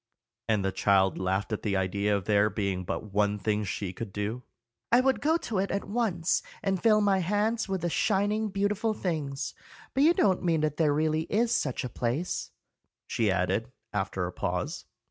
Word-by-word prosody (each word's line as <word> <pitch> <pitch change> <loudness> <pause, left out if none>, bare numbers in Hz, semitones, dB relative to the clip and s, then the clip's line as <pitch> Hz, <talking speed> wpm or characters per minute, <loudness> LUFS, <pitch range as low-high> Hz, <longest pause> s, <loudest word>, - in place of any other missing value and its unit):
and 105 -3 +1
the 95 - +1
child 95 -2 +2
laughed 95 +3 -1
at 105 - -2
the 100 -2 0
idea 100 +2 +1
of 95 - -6
there 105 0 +3
being 100 -3 -2
but 100 +3 -5
one 105 0 +2
thing 105 +1 0
she 100 -1 -3
could 110 +2 -6
do. 105 +5 -3 0.5
"I 240 - +7
would 265 +1 +2
go 320 +3 +3
to 220 - -3
it 195 - 0
at 200 - -1
once, 200 -6 +1 0.2
and 190 -3 0
fill 215 -2 +5
my 200 -2 +3
hands 210 +4 0
with 190 -2 -1
the 175 - 0
shining, 210 +3 +1
beautiful 205 +2 0
things. 150 -8 -3 0.4
But 270 - +2
you 325 +4 +6
don't 190 -3 +3
mean 165 -3 +1
that 150 -1 -1
there 155 -3 +3
really 155 +2 +1
is 230 +2 +2
such 145 - -1
a - - -2
place," 125 +9 -2 0.6
she 110 -3 0
added, 95 +6 0 0.2
after 95 -2 -1
a 90 - -4
pause. - - -3
150 Hz, 190 wpm, -28 LUFS, -, 0.6 s, I